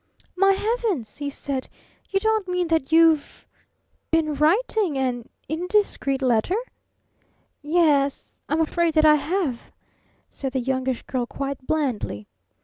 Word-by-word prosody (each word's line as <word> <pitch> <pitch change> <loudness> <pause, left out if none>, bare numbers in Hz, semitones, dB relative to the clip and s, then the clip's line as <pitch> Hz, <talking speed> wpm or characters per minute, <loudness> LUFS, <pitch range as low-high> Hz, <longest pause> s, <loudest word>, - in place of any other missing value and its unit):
"My 390 +1 +4
heavens!" 415 - -2
he 285 -1 -3
said. 275 -1 -5 0.4
"You 390 - +1
don't 440 -1 0
mean 360 -1 -1
that 320 -3 0
you've 325 -2 +3 0.6
been 320 -2 +1
writing 345 - +1
an 250 -3 -2 0.2
'indiscreet 320 -5 0
letter'?" 245 - +2 1.1
"Y 310 +4 0
e 290 -5 +5
s 280 - -9
I'm 310 +3 +1
afraid 330 +1 0
that 310 0 +5
I 305 - +8
have," 300 -5 -2 0.6
said 270 -2 -6
the 265 - 0
Youngish 260 0 -2
Girl 250 -2 -3
quite 275 -1 -5
blandly. 245 - -2
305 Hz, 135 wpm, -23 LUFS, 265-355 Hz, 1.1 s, I